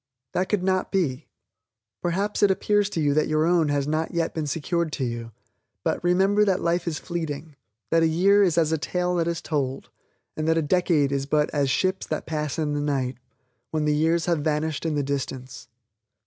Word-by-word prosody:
That 185 Hz, +1 st, 0 dB
could 205 Hz, -4 st, 0 dB
not 185 Hz, 0 st, 0 dB
be. 160 Hz, -10 st, -1 dB, 0.7 s
Perhaps 195 Hz, +4 st, -1 dB
it 205 Hz, -, +6 dB
appears 205 Hz, +1 st, +2 dB
to 170 Hz, -, -3 dB
you 145 Hz, -2 st, +2 dB
that 155 Hz, +1 st, +2 dB
your 155 Hz, 0 st, +2 dB
own 170 Hz, -3 st, +3 dB
has 145 Hz, -1 st, 0 dB
not 155 Hz, +2 st, -1 dB
yet 165 Hz, -1 st, 0 dB
been 155 Hz, -2 st, -3 dB
secured 165 Hz, +3 st, -1 dB
to 135 Hz, -, -2 dB
you, 115 Hz, -1 st, -4 dB, 0.5 s
but, -, -, -1 dB
remember 190 Hz, +4 st, +3 dB
that 195 Hz, -3 st, +2 dB
life 170 Hz, +1 st, 0 dB
is 160 Hz, -2 st, -1 dB
fleeting 160 Hz, -3 st, -5 dB, 0.4 s
that 165 Hz, -, +4 dB
a 165 Hz, -, +4 dB
year 190 Hz, +6 st, +4 dB
is 180 Hz, -4 st, +3 dB
as 160 Hz, -2 st, +3 dB
a 160 Hz, -, +1 dB
tale 180 Hz, +3 st, -1 dB
that 165 Hz, -1 st, +1 dB
is 170 Hz, 0 st, -2 dB
told 135 Hz, -4 st, -2 dB, 0.5 s
and 155 Hz, 0 st, -2 dB
that 165 Hz, 0 st, +3 dB
a 165 Hz, -, +2 dB
decade 155 Hz, -3 st, +2 dB
is 140 Hz, 0 st, -1 dB
but 150 Hz, 0 st, +1 dB
as 140 Hz, -2 st, +1 dB
"Ships 185 Hz, +8 st, 0 dB
that 155 Hz, -, -3 dB
pass 150 Hz, -3 st, -3 dB
in 150 Hz, -2 st, -1 dB
the 145 Hz, -, -1 dB
night" 135 Hz, -4 st, -1 dB, 0.5 s
when 155 Hz, -1 st, -1 dB
the 150 Hz, -, +2 dB
years 160 Hz, +2 st, +2 dB
have 170 Hz, -3 st, +1 dB
vanished 155 Hz, +1 st, -1 dB
in 155 Hz, -, -1 dB
the 145 Hz, -, 0 dB
distance. 135 Hz, -3 st, -4 dB
160 Hz, 205 wpm, -25 LUFS, 145-175 Hz, 0.7 s, it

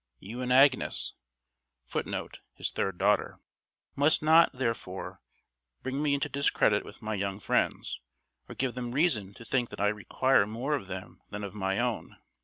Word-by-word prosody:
You 110 Hz, -, -7 dB
and 125 Hz, 0 st, -2 dB
Agnes 135 Hz, +1 st, +4 dB, 0.7 s
[Footnote: -, -, -4 dB, 0.2 s
His -, -, -2 dB
third 95 Hz, -2 st, -2 dB
daughter.] 100 Hz, +2 st, +1 dB, 0.6 s
must 145 Hz, +2 st, +3 dB
not, 160 Hz, +2 st, +6 dB
therefore, 115 Hz, -7 st, -4 dB, 0.6 s
bring 130 Hz, +2 st, -2 dB
me 145 Hz, -2 st, +2 dB
into 140 Hz, +1 st, -1 dB
discredit 140 Hz, +1 st, +2 dB
with -, -, -12 dB
my 110 Hz, 0 st, -2 dB
young 100 Hz, -1 st, -2 dB
friends, -, -, 0 dB, 0.5 s
or -, -, -8 dB
give 130 Hz, -2 st, -1 dB
them 120 Hz, -1 st, -4 dB
reason 115 Hz, -, +1 dB
to 115 Hz, -, -12 dB
think 125 Hz, -2 st, 0 dB
that -, -, -9 dB
I 105 Hz, -, +3 dB
require 105 Hz, +2 st, +2 dB
more 120 Hz, +7 st, -2 dB
of 135 Hz, -9 st, -2 dB
them 95 Hz, -1 st, -8 dB
than 105 Hz, 0 st, -6 dB
of 100 Hz, -, -5 dB
my 95 Hz, -2 st, -1 dB
own. 120 Hz, -1 st, -2 dB
120 Hz, 165 wpm, -29 LUFS, 100-135 Hz, 0.7 s, not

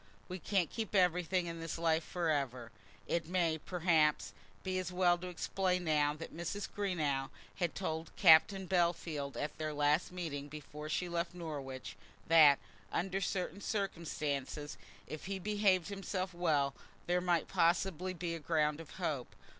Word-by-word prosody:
we 185 Hz, 0 st, -5 dB
can't 185 Hz, -3 st, 0 dB
keep 225 Hz, -3 st, -3 dB
everything 180 Hz, -1 st, +3 dB
in 165 Hz, -1 st, -5 dB
this 165 Hz, 0 st, -4 dB
life 165 Hz, -1 st, +2 dB
for 170 Hz, -1 st, -1 dB
ever." 130 Hz, -5 st, -2 dB, 0.3 s
It 170 Hz, -2 st, -1 dB
may, 170 Hz, -3 st, +1 dB
perhaps, 160 Hz, -3 st, +2 dB, 0.3 s
be 185 Hz, -1 st, -1 dB
as 185 Hz, -1 st, -4 dB
well 180 Hz, -1 st, +4 dB
to 180 Hz, -, -6 dB
explain 180 Hz, +1 st, -1 dB
now 150 Hz, -2 st, +2 dB
that 165 Hz, +1 st, -8 dB
Mrs. 175 Hz, +5 st, -3 dB
Greenow 155 Hz, -9 st, -1 dB, 0.3 s
had 175 Hz, -3 st, -1 dB
told 160 Hz, -4 st, -3 dB
Captain 190 Hz, +2 st, +6 dB
Bellfield 170 Hz, -6 st, 0 dB
at 150 Hz, -, -3 dB
their 155 Hz, -1 st, -2 dB
last 150 Hz, +4 st, +2 dB
meeting 155 Hz, -6 st, -4 dB
before 150 Hz, +1 st, -8 dB
she 180 Hz, +3 st, 0 dB
left 170 Hz, 0 st, -2 dB
Norwich, 140 Hz, -6 st, -6 dB, 0.3 s
that, 155 Hz, -4 st, +8 dB, 0.3 s
under 195 Hz, +2 st, -1 dB
certain 185 Hz, 0 st, -2 dB
circumstances, 150 Hz, -8 st, -3 dB, 0.3 s
if 155 Hz, -, -7 dB
he 195 Hz, 0 st, -3 dB
behaved 200 Hz, -2 st, +2 dB
himself 195 Hz, -1 st, -3 dB
well, 150 Hz, -6 st, +1 dB, 0.3 s
there 180 Hz, +1 st, +1 dB
might 175 Hz, -2 st, +1 dB
possibly 185 Hz, +1 st, +1 dB
be 170 Hz, -1 st, -3 dB
ground 150 Hz, -1 st, +1 dB
of 165 Hz, -, -10 dB
hope. 150 Hz, -9 st, -3 dB
170 Hz, 150 wpm, -34 LUFS, 150-185 Hz, 0.3 s, that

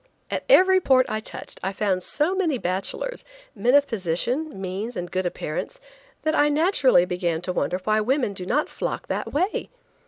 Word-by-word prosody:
At -, -, -3 dB
every 375 Hz, -5 st, +6 dB
port 260 Hz, -5 st, +4 dB
I 215 Hz, -, -1 dB
touched 220 Hz, -, -7 dB
I 190 Hz, -, -2 dB
found 195 Hz, -2 st, -1 dB
so 300 Hz, -, +2 dB
many 345 Hz, -8 st, 0 dB
bachelors, 230 Hz, -, -2 dB, 0.3 s
men 245 Hz, +3 st, +2 dB
of 285 Hz, 0 st, +6 dB
position, 230 Hz, -, -1 dB
means 195 Hz, +5 st, -4 dB
and 175 Hz, -2 st, -5 dB
good 185 Hz, -1 st, -1 dB
appearance, 175 Hz, -, -5 dB, 0.4 s
that 310 Hz, -, +1 dB
I 295 Hz, 0 st, +3 dB
naturally 290 Hz, -, +3 dB
began 175 Hz, -2 st, -1 dB
to 180 Hz, -, -2 dB
wonder 180 Hz, +3 st, -1 dB
why 215 Hz, +1 st, +2 dB
women 250 Hz, -1 st, 0 dB
do 185 Hz, -2 st, -6 dB
not 300 Hz, +8 st, +1 dB
flock -, -, -5 dB
that -, -, -3 dB
way. 365 Hz, +8 st, -1 dB
235 Hz, 180 wpm, -24 LUFS, 185-300 Hz, 0.4 s, every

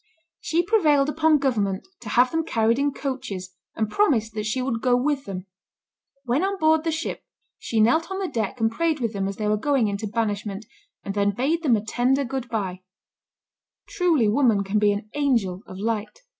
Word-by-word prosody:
She 330 Hz, +3 st, 0 dB
prevailed 305 Hz, -9 st, +3 dB
upon 315 Hz, 0 st, +3 dB
government 210 Hz, -, -1 dB
to 220 Hz, -, -8 dB
have 245 Hz, +3 st, +4 dB
them 325 Hz, 0 st, 0 dB
carried 230 Hz, -4 st, +1 dB
in 285 Hz, 0 st, +1 dB
coaches, 255 Hz, -10 st, -5 dB, 0.2 s
and 220 Hz, -, 0 dB
promised 225 Hz, -, +1 dB
that 215 Hz, -1 st, -3 dB
she 235 Hz, +4 st, -1 dB
would 250 Hz, -3 st, -2 dB
go 250 Hz, -1 st, +3 dB
with 280 Hz, +2 st, 0 dB
them. 185 Hz, -1 st, -6 dB, 0.8 s
When 255 Hz, +7 st, +1 dB
on 395 Hz, +1 st, 0 dB
board 315 Hz, -2 st, +3 dB
the 330 Hz, -, 0 dB
ship, 320 Hz, +1 st, -4 dB, 0.4 s
she 225 Hz, -, -2 dB
knelt 240 Hz, -, +3 dB
on 380 Hz, -, -3 dB
the 385 Hz, -1 st, -2 dB
deck 225 Hz, -, -3 dB
and 225 Hz, 0 st, +2 dB
prayed 320 Hz, +5 st, 0 dB
with 230 Hz, -3 st, -2 dB
them 195 Hz, -1 st, -1 dB
as 195 Hz, -, -4 dB
they 215 Hz, -, -2 dB
were 210 Hz, 0 st, +2 dB
going 265 Hz, -2 st, +1 dB
into 200 Hz, +2 st, -3 dB
banishment, 210 Hz, -1 st, -2 dB, 0.4 s
and 195 Hz, -, -4 dB
then 200 Hz, 0 st, +1 dB
bade 300 Hz, +8 st, 0 dB
them 270 Hz, -8 st, +3 dB
a 210 Hz, 0 st, -3 dB
tender 255 Hz, +5 st, +1 dB
good 255 Hz, 0 st, -4 dB
by. 190 Hz, -5 st, -3 dB, 1.1 s
Truly 340 Hz, -, +2 dB
woman 220 Hz, -3 st, +3 dB
can 200 Hz, +2 st, 0 dB
be 205 Hz, 0 st, +4 dB
an 205 Hz, +1 st, -3 dB
angel 230 Hz, -11 st, 0 dB
of 185 Hz, -, -9 dB
light. 220 Hz, -, -3 dB
235 Hz, 200 wpm, -24 LUFS, 210-290 Hz, 1.1 s, have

